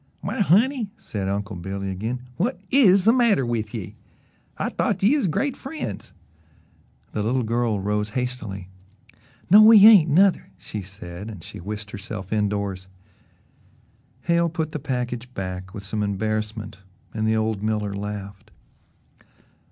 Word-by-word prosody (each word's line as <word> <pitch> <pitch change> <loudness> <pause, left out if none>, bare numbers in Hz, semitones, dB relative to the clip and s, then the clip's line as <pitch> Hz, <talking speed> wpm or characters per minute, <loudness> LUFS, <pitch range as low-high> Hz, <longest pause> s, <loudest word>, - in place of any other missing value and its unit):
"Why, - - -4
honey," 220 - +3
said 95 -3 -4
Uncle 100 +1 -3
Billy 95 +2 -4
again, 115 +7 -4 0.2
"whut 240 +9 0
IS 200 -8 +6
the 225 +3 +5
matter 235 - +3
with 110 -3 -2
ye? 110 -6 -7 0.6
I - - -1
thought - - -1
ye 230 +9 +5
was 275 -10 +1
great 270 - -1
friends." 290 +4 -6 1.0
The 105 - -2
little 125 +4 0
girl 115 -2 0
rose 105 +2 -1
hastily. 120 -7 -4 0.8
"No, 210 +2 +10
we 215 -1 +9
ain't, 200 -8 +8
nuther," 185 +5 +3
she 105 - -6
said, 95 +1 -9
and 100 -7 -9
she - - -10
whisked 105 +3 -6
herself 100 -1 -6
indoors. 100 -3 -1 1.3
Hale 170 0 +2
put 160 -1 -3
the 150 - -4
package 125 -3 -4
back 95 0 -5
with 100 -1 -8
some 105 +2 -3
embarrassment 105 +1 -3 0.3
and 110 0 -1
the 110 - +2
old 110 -2 -1
miller 105 -1 -1
laughed. 100 -1 -6
110 Hz, 145 wpm, -23 LUFS, 100-160 Hz, 1.3 s, No